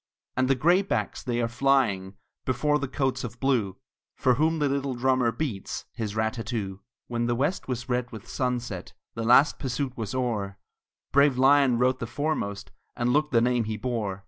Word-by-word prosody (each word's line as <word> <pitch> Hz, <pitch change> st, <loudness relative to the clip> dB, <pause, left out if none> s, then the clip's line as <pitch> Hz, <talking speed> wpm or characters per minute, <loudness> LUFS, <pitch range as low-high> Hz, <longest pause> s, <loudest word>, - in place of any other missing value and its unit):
And 130 Hz, 0 st, +2 dB
the 135 Hz, -, +3 dB
graybacks 175 Hz, +8 st, +1 dB
they 120 Hz, -1 st, -1 dB
are -, -, +1 dB
flying 120 Hz, -7 st, +1 dB, 0.3 s
Before 150 Hz, +4 st, +1 dB
the 140 Hz, -, -2 dB
coats 135 Hz, 0 st, -1 dB
of 120 Hz, 0 st, -7 dB
blue, 115 Hz, -9 st, +1 dB, 0.4 s
For 125 Hz, -, +3 dB
whom 160 Hz, +5 st, +2 dB
the 150 Hz, -2 st, +1 dB
little 140 Hz, -1 st, -1 dB
drummer 130 Hz, -1 st, +2 dB
beats 115 Hz, -9 st, -4 dB
His 110 Hz, -2 st, -4 dB
rat 110 Hz, 0 st, 0 dB
tat 115 Hz, -2 st, -6 dB
too. 100 Hz, -6 st, -3 dB, 0.3 s
When 120 Hz, 0 st, -2 dB
the 120 Hz, -, +1 dB
west 145 Hz, +10 st, -1 dB
was 125 Hz, -2 st, -3 dB
red 125 Hz, -1 st, -1 dB
with 110 Hz, -3 st, -9 dB
sunset, 120 Hz, -7 st, -3 dB, 0.2 s
The 115 Hz, -, -5 dB
last 125 Hz, +6 st, +5 dB
pursuit 130 Hz, -1 st, -2 dB
was 110 Hz, 0 st, -4 dB
o'er; 105 Hz, -6 st, -2 dB, 0.5 s
Brave 140 Hz, -1 st, +4 dB
Lyon 135 Hz, -1 st, +5 dB
rode 130 Hz, +1 st, +2 dB
the 115 Hz, -, -4 dB
foremost, 120 Hz, -7 st, -3 dB, 0.2 s
And 120 Hz, +1 st, +1 dB
looked 150 Hz, +1 st, +2 dB
the 115 Hz, -3 st, +4 dB
name 120 Hz, -1 st, +2 dB
he 110 Hz, 0 st, -3 dB
bore. 105 Hz, -5 st, -2 dB
125 Hz, 185 wpm, -26 LUFS, 115-135 Hz, 0.5 s, last